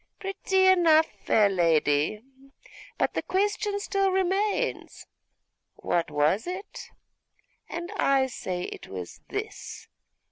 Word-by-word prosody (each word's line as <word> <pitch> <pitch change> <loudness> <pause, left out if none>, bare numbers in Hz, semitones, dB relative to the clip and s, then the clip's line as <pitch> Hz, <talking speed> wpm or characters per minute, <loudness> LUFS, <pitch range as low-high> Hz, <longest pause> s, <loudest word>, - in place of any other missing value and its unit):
pretty 385 -1 +1
enough, 335 -4 +6 0.2
fair 215 -2 +4
lady; 165 +1 +1 0.7
but - - 0
the - - -1
question 410 +1 -1
still 395 -1 0
remains, 390 +5 -1 0.7
what 170 -2 -1
was 150 - +1
it? 370 +3 -7 0.8
and 345 +3 -5
I 275 -6 +3
say 185 -8 -4
it - - -8
was 90 -2 -8
this. - - -6
335 Hz, 105 wpm, -27 LUFS, -, 0.8 s, enough